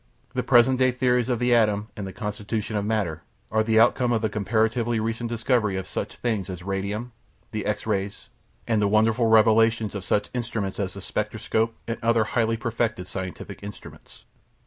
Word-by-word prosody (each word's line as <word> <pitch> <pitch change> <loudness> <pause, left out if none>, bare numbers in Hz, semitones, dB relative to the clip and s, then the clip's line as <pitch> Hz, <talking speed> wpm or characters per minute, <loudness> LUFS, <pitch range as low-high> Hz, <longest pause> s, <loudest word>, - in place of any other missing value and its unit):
The - - 0
present 125 +2 +4
day 130 0 +5
theories 125 -1 +1
of 125 - +1
the 120 +1 +2
atom 105 -2 +2
and 100 -3 -5
the - - -6
constitution 105 +2 -4
of 105 - 0
matter 100 -7 -1 0.3
are 110 - +3
the 110 0 +3
outcome 120 +1 +4
of 115 -1 +1
the 110 - +2
comparatively 110 +3 +1
recent 115 +2 -2
discovery 115 -4 +1
of 95 - -3
such - - -5
things 110 -6 -2
as 90 -2 -6
radium, 100 +5 -3 0.4
the 110 -1 -3
X 105 - -2
rays, 100 -2 -3 0.4
and 110 -2 +2
the 105 - +3
wonderful 110 +3 +3
revelations 110 0 +4
of 100 -3 -5
such 105 +2 0
instruments 110 -5 -3
as 95 -2 -2
the 100 - -7
spectroscope 110 +3 -1
and 115 0 -3
other 115 -1 +3
highly 115 0 0
perfected 115 -4 -2
scientific 95 -1 -6
instruments. 100 0 -11
110 Hz, 180 wpm, -25 LUFS, 105-115 Hz, 0.4 s, day